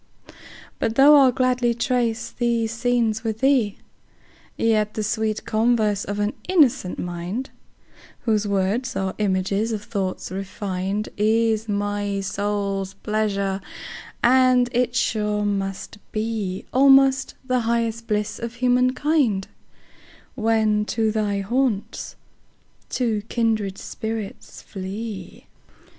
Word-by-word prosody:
But 225 Hz, -, -1 dB
though 285 Hz, +3 st, +8 dB
I'll 270 Hz, -3 st, +6 dB
gladly 250 Hz, -1 st, +1 dB
trace 240 Hz, -1 st, 0 dB
these 235 Hz, -2 st, 0 dB
scenes 230 Hz, -2 st, 0 dB
with 220 Hz, -1 st, -3 dB
thee, 260 Hz, -7 st, +3 dB, 0.8 s
Yet 215 Hz, -2 st, +1 dB
the 215 Hz, -, -1 dB
sweet 215 Hz, 0 st, -1 dB
converse 215 Hz, -2 st, +1 dB
of 205 Hz, +1 st, -4 dB
an 205 Hz, +1 st, 0 dB, 0.2 s
innocent 275 Hz, -, +3 dB
mind, 175 Hz, +9 st, -4 dB, 0.7 s
Whose 215 Hz, -3 st, +1 dB
words 200 Hz, +6 st, 0 dB
are 190 Hz, -1 st, -1 dB
images 200 Hz, +2 st, 0 dB
of 210 Hz, -2 st, -3 dB
thoughts 195 Hz, -4 st, -3 dB
refin'd, 195 Hz, +1 st, -3 dB
Is 220 Hz, +1 st, +2 dB
my 205 Hz, 0 st, -1 dB
soul's 200 Hz, -1 st, -2 dB
pleasure; 200 Hz, -2 st, -1 dB, 0.6 s
and 255 Hz, 0 st, +5 dB
it 245 Hz, 0 st, 0 dB
sure 210 Hz, -3 st, 0 dB
must 195 Hz, 0 st, -3 dB
beAlmost 255 Hz, +6 st, +2 dB
the 255 Hz, -1 st, +1 dB
highest 230 Hz, 0 st, -1 dB
bliss 210 Hz, -1 st, -1 dB
of 235 Hz, 0 st, -5 dB
human 250 Hz, +1 st, +2 dB
kind, 275 Hz, -11 st, +1 dB, 0.9 s
When 220 Hz, -2 st, +2 dB
to 220 Hz, 0 st, 0 dB
thy 205 Hz, -2 st, 0 dB
haunts 235 Hz, 0 st, -1 dB, 0.7 s
two 230 Hz, -5 st, 0 dB
kindred 220 Hz, -5 st, 0 dB
spirits 220 Hz, -2 st, -6 dB
flee. 200 Hz, +2 st, -7 dB
220 Hz, 110 wpm, -23 LUFS, 205-240 Hz, 0.9 s, though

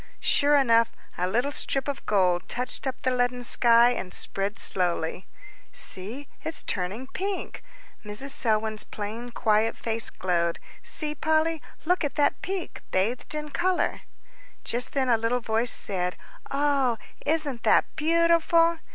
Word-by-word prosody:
Sure 290 Hz, +1 st, +3 dB
enough, 230 Hz, -4 st, +4 dB, 0.2 s
a 180 Hz, -, -1 dB
little 240 Hz, +9 st, 0 dB
strip 270 Hz, -1 st, -1 dB
of 285 Hz, -, -4 dB
gold 180 Hz, -4 st, +2 dB
touched 250 Hz, +2 st, -1 dB
up 260 Hz, 0 st, -3 dB
the 255 Hz, -, +1 dB
leaden 245 Hz, 0 st, 0 dB
sky, 235 Hz, 0 st, +6 dB
and 185 Hz, -7 st, -3 dB
spread 200 Hz, +2 st, +1 dB
slowly. 175 Hz, -1 st, 0 dB, 0.4 s
"See, 230 Hz, +10 st, -5 dB, 0.2 s
it's 320 Hz, -, -3 dB
turning 195 Hz, +7 st, -2 dB
pink." 390 Hz, +7 st, -4 dB, 0.4 s
Mrs. 210 Hz, +7 st, -3 dB
Selwyn's 220 Hz, -3 st, +1 dB
plain, 220 Hz, +4 st, -6 dB
quiet 225 Hz, -1 st, +1 dB
face 225 Hz, -1 st, -2 dB
glowed. 170 Hz, -2 st, 0 dB, 0.2 s
"See, 300 Hz, -2 st, -3 dB
Polly, 315 Hz, +1 st, +1 dB, 0.2 s
look 360 Hz, +1 st, +2 dB
at 290 Hz, -, -2 dB
that 290 Hz, -, +2 dB
peak 380 Hz, -2 st, -4 dB
bathed 230 Hz, +10 st, -1 dB
in 300 Hz, 0 st, -4 dB
colour." 365 Hz, +3 st, 0 dB, 0.6 s
Just 245 Hz, +2 st, -2 dB
then 270 Hz, -2 st, +1 dB
a 235 Hz, -2 st, +4 dB
little 230 Hz, +2 st, 0 dB
voice 225 Hz, +1 st, 0 dB
said, 180 Hz, -3 st, -2 dB, 0.3 s
"Oh, 275 Hz, -4 st, +1 dB, 0.3 s
isn't 290 Hz, -5 st, 0 dB
that -, -, +4 dB
beautiful!" 335 Hz, +1 st, +3 dB
245 Hz, 140 wpm, -26 LUFS, 215-290 Hz, 0.6 s, sky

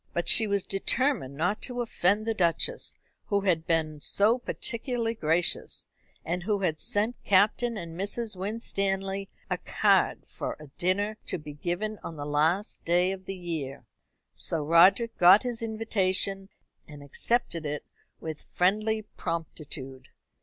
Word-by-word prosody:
But 175 Hz, -, -2 dB
she 220 Hz, -, +7 dB
was 200 Hz, -2 st, +1 dB
determined 195 Hz, -, 0 dB
not 180 Hz, +7 st, 0 dB
to 245 Hz, -1 st, -3 dB
offend 215 Hz, -3 st, +1 dB
the 225 Hz, -, 0 dB
Duchess, 170 Hz, -5 st, -1 dB, 0.3 s
who 200 Hz, -1 st, +1 dB
had 170 Hz, -4 st, +1 dB
been 155 Hz, -2 st, 0 dB
so 215 Hz, +10 st, +2 dB
particularly 235 Hz, -1 st, -2 dB
gracious, 165 Hz, -4 st, 0 dB, 0.4 s
and 175 Hz, +2 st, -2 dB
who 200 Hz, +2 st, -1 dB
had 160 Hz, -4 st, 0 dB
sent 215 Hz, +4 st, 0 dB
Captain 215 Hz, +4 st, +3 dB
and 170 Hz, -4 st, -7 dB
Mrs. 205 Hz, +4 st, -2 dB
Winstanley 195 Hz, -1 st, -2 dB, 0.2 s
a -, -, -2 dB
card -, -, +2 dB
for -, -, -5 dB
a 150 Hz, -2 st, -12 dB
dinner 205 Hz, +4 st, 0 dB
to -, -, +1 dB
be 150 Hz, -2 st, -9 dB
given 185 Hz, +8 st, -3 dB
on 165 Hz, -, -6 dB
the 145 Hz, -1 st, -6 dB
last 160 Hz, +8 st, 0 dB
day 175 Hz, +2 st, +2 dB
of 190 Hz, -1 st, -7 dB
the 195 Hz, -, -5 dB
year. 150 Hz, -7 st, -5 dB, 0.5 s
So 160 Hz, -2 st, -1 dB
Roderick 185 Hz, +9 st, +5 dB
got 185 Hz, +5 st, +8 dB
his 240 Hz, -2 st, -2 dB
invitation, 195 Hz, -3 st, 0 dB, 0.4 s
and 145 Hz, -1 st, -11 dB
accepted 170 Hz, -, 0 dB
it 150 Hz, -1 st, -4 dB, 0.3 s
with 160 Hz, -2 st, -6 dB
friendly 215 Hz, +4 st, +1 dB
promptitude. 150 Hz, -8 st, -6 dB
190 Hz, 145 wpm, -28 LUFS, 165-215 Hz, 0.5 s, got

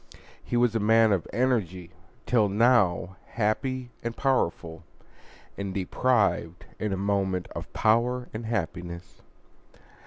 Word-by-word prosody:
He 120 Hz, -, -2 dB
was 120 Hz, -2 st, +3 dB
a 115 Hz, -, +1 dB
man 110 Hz, +1 st, +4 dB
of 95 Hz, -4 st, 0 dB
energy, 100 Hz, -9 st, -1 dB, 0.3 s
till 110 Hz, -5 st, +3 dB
now 100 Hz, -5 st, +2 dB
happy 120 Hz, +3 st, -2 dB
and 115 Hz, 0 st, -5 dB
powerful, 85 Hz, -, -1 dB, 0.8 s
and 100 Hz, -1 st, -4 dB
deprived 100 Hz, -3 st, 0 dB
in 105 Hz, -1 st, -2 dB
a 95 Hz, -, -1 dB
moment 95 Hz, -2 st, -1 dB
of -, -, -8 dB
power 125 Hz, +3 st, +1 dB
and 110 Hz, +1 st, -5 dB
happiness. 90 Hz, -4 st, -5 dB
105 Hz, 120 wpm, -27 LUFS, 95-120 Hz, 0.8 s, man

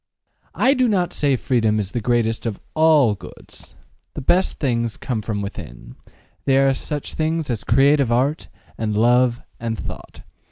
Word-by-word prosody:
I 265 Hz, -, +4 dB
do 255 Hz, -2 st, +2 dB
not 185 Hz, -5 st, 0 dB
say 140 Hz, -2 st, +1 dB
freedom 115 Hz, -4 st, +1 dB
is 100 Hz, -2 st, -3 dB
the 120 Hz, -, -3 dB
greatest 115 Hz, 0 st, 0 dB
of 105 Hz, -, -4 dB
ALL 155 Hz, -7 st, +4 dB
goods: 105 Hz, -, -13 dB, 0.4 s
the -, -, -4 dB
best 180 Hz, +7 st, +1 dB
things 120 Hz, -5 st, -1 dB
come 120 Hz, -4 st, -3 dB
from 105 Hz, -1 st, -3 dB
within -, -, -9 dB, 0.5 s
they 135 Hz, -1 st, +3 dB
are 135 Hz, 0 st, +4 dB
such 145 Hz, +2 st, -5 dB
things 160 Hz, -2 st, -1 dB
as 110 Hz, -4 st, -3 dB
creative 140 Hz, +1 st, +3 dB
art, 135 Hz, +6 st, 0 dB, 0.3 s
and 105 Hz, -2 st, -1 dB
love, 120 Hz, +1 st, +3 dB, 0.2 s
and 115 Hz, -1 st, -3 dB
thought. -, -, -9 dB
125 Hz, 160 wpm, -21 LUFS, 110-145 Hz, 0.5 s, I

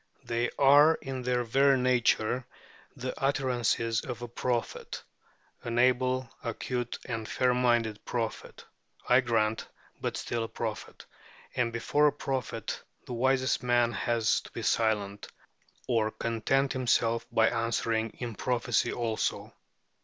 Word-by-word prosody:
They 120 Hz, +1 st, -1 dB
are 145 Hz, +3 st, +7 dB
in 135 Hz, -1 st, -6 dB
their 125 Hz, 0 st, 0 dB
very 135 Hz, +3 st, +4 dB
nature 125 Hz, -1 st, +1 dB, 0.5 s
the 130 Hz, +1 st, -4 dB
utterances 125 Hz, -4 st, +1 dB
of 120 Hz, -2 st, -6 dB
a -, -, -4 dB
prophet 120 Hz, 0 st, -3 dB, 0.6 s
an 120 Hz, 0 st, -3 dB
able, 130 Hz, +1 st, +2 dB, 0.2 s
acute, 120 Hz, +1 st, -3 dB
and 115 Hz, -2 st, -4 dB
fair 125 Hz, -1 st, +2 dB
minded 120 Hz, -4 st, +1 dB
prophet, 115 Hz, -2 st, -4 dB, 0.4 s
I 125 Hz, +1 st, +6 dB
grant, 110 Hz, -3 st, 0 dB, 0.3 s
but -, -, -2 dB
still 115 Hz, -1 st, -2 dB
a -, -, -6 dB
prophet -, -, -6 dB, 0.5 s
and 120 Hz, -2 st, +1 dB
before 145 Hz, +6 st, +2 dB
a -, -, +4 dB
prophet 125 Hz, -5 st, -3 dB, 0.2 s
the -, -, -6 dB
wisest 130 Hz, +2 st, +1 dB
man 120 Hz, -1 st, +2 dB
has 115 Hz, +1 st, +1 dB
to -, -, -13 dB
be -, -, -7 dB
silent, 105 Hz, -3 st, 0 dB, 0.6 s
or 115 Hz, -3 st, +2 dB
content 115 Hz, +5 st, 0 dB
himself 115 Hz, -2 st, +1 dB
by 110 Hz, 0 st, +4 dB
answering 115 Hz, -1 st, 0 dB
in 120 Hz, -2 st, -4 dB
prophecy 120 Hz, +1 st, 0 dB
also. 115 Hz, -2 st, -2 dB
120 Hz, 130 wpm, -29 LUFS, 115-130 Hz, 0.6 s, are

